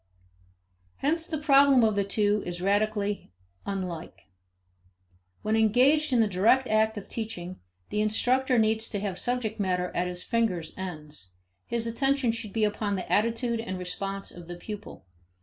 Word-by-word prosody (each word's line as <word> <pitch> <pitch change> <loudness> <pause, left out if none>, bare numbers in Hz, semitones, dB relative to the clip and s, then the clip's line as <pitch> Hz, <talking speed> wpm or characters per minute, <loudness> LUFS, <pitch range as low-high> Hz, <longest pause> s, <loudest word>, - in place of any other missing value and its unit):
Hence 325 +4 0
the 315 - -2
problem 280 -3 +5
of 220 -1 +4
the 200 0 +1
two 205 +1 +1
is 175 0 -5
radically 205 - 0 0.4
unlike. 180 - -5 1.1
When 215 +1 +1
engaged 255 +8 +4
in 245 -2 +4
the 220 - +3
direct 220 +7 +3
act 220 0 +2
of 200 - -7
teaching, 185 -6 -6 0.3
the 210 - 0
instructor 250 +4 +2
needs 220 0 +2
to 205 - -2
have 195 -2 -3
subject 245 -3 -1
matter 180 -2 0
at 180 +1 0
his 180 0 -3
fingers' 185 -9 -1
ends; 150 - -6 0.3
his 235 -1 -2
attention 265 +2 +1
should 225 -2 -6
be 220 +1 0
upon 210 -1 0
the 185 - -5
attitude 230 +2 +1
and 190 -5 -4
response 195 +2 -4
of 175 -1 -11
the 175 - -6
pupil. 210 +4 -8
215 Hz, 155 wpm, -28 LUFS, 190-230 Hz, 1.1 s, problem